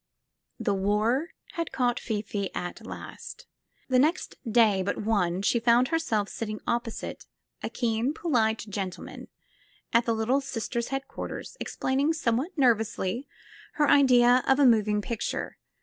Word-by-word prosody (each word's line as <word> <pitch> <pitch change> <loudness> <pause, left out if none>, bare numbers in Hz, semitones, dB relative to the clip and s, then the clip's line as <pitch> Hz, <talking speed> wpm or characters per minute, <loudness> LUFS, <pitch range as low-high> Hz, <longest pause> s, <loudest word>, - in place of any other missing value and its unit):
The 205 - 0
war 210 - +1 0.2
had 335 -1 -3
caught 245 -2 +1
Fifi 205 -3 -3
at 175 0 -5
last. - - -9 0.4
The 255 -1 +3
next 315 +7 +1 0.2
day 215 -4 +4
but 190 - -2
one 195 -4 0
she 235 - +2
found 240 +2 +4
herself 275 -11 0
sitting 215 -1 -5
opposite 235 -1 -3 0.3
a - - -3
keen, 235 +2 0
polite 225 -11 +1
gentle 195 -3 -4
man - - -10 0.7
at 235 0 +4
the 230 - +2
Little 240 +5 +1
Sisters' 235 -2 -3
headquarters, 270 - -5
explaining 275 +4 0
some 250 -8 0
what 325 +8 -4
nervously 230 -1 +1 0.5
her 295 -1 +2
idea 250 -3 +6
of 270 - +5
a 285 - +5
moving 210 -3 +3
picture. 230 0 -4
235 Hz, 140 wpm, -27 LUFS, 210-265 Hz, 0.7 s, idea